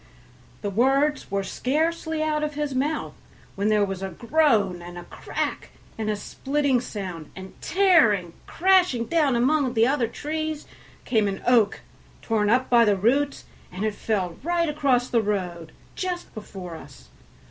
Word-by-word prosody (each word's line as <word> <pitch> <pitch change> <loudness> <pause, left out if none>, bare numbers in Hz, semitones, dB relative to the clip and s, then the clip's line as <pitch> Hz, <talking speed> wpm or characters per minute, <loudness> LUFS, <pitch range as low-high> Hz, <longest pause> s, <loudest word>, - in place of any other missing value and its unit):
The 205 - -2
words 270 +7 +2
were 200 0 -1
scarcely 320 +7 -1
out 305 -1 0
of 300 -1 -3
his 295 -2 -2
mouth 290 +4 -1 0.4
when 200 +1 -1
there 210 -1 +3
was 195 -1 -5
a 195 - -3
groan, 220 - +1
and 175 0 -9
a 175 - -7
crack, - - -4 0.3
and 220 -1 -3
a 210 - +1
splitting 275 +4 0
sound, 185 -9 -6
and 190 0 -9
tearing, 300 - +3
crashing 360 -10 +3
down 300 -3 +2
among 260 +1 +2
the 225 0 +5
other 260 -2 +1
trees 310 +4 -4 0.4
came 220 -4 +2
an 195 -1 -4
oak, 235 -4 +3 0.4
torn 215 -2 +1
up 255 +3 +3
by 235 -1 +5
the 205 -3 +3
roots, 275 +8 +1 0.3
and 185 +4 -3
it 215 - 0
fell 190 -5 -2
right 340 +3 0
across 275 -5 +1
the 235 -2 +2
road 180 -6 -3 0.2
just 360 -1 -4
before 190 -5 -8
us. 135 - -14
240 Hz, 160 wpm, -24 LUFS, 200-300 Hz, 0.4 s, the